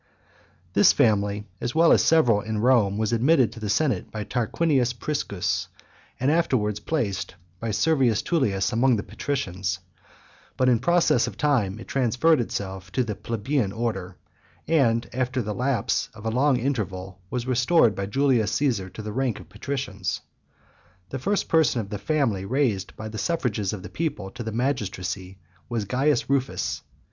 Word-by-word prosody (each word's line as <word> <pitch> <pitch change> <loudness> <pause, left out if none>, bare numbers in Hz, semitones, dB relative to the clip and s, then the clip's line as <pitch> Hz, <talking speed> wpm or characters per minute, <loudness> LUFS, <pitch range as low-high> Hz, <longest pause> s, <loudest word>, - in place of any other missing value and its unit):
This - - +6
family, 105 -1 +2 0.2
as 120 - -3
well 165 +1 +5
as - - +5
several 120 -10 +4
in 110 +1 -3
Rome, 110 -4 +3
was 110 +1 0
admitted 130 +1 +4
into - - -10
the 105 -2 -4
senate 120 -2 +1
by 110 -1 -5
Tarquinius 125 +3 +1
Priscus, 95 - -2 0.5
and 130 - +2
soon 160 - +3
afterwards 105 -10 0
placed 105 - -2 0.2
by 115 - -3
Servius 130 -1 +2
Tullius 110 - +1
among 125 +2 +4
the 100 - -2
patricians; 95 -9 -3 0.8
but 130 - +2
in 120 -3 +3
process 175 +4 +3
of - - -7
time 120 -10 +1
it 115 - -10
transferred 135 +4 +2
itself 95 -4 -5
to 130 - +2
the 110 -3 -3
plebeian 110 +2 -1
order, 95 -5 -3 0.5
and, 120 -7 +2
after 130 +1 -1
the 105 -3 -2
lapse 125 -1 0
of 105 0 -11
a 110 - 0
long 130 +2 +3
interval, 100 -8 -3
was 125 +1 -3
restored 125 - +3
by 100 -1 -4
Julius 125 -3 +2
Caesar 115 -10 0
to 110 - -9
the 105 0 -5
rank 130 -2 -1
of 85 - -14
patricians. 105 -3 -4 0.9
The 135 - -4
first 200 +8 0
person 160 -6 +3
of 100 -3 -5
the 105 - -3
family 110 -4 0
raised 110 -4 0
by 110 - -6
the 110 0 -6
suffrages 120 - -1
of 100 -4 -6
the - - -6
people 105 - -3
to 120 - -8
the 110 -1 -4
magistracy, 95 -6 -3 0.3
was 115 -4 -2
Caius 130 +5 +1
Rufus. 135 -1 -1
115 Hz, 165 wpm, -25 LUFS, 100-135 Hz, 0.9 s, This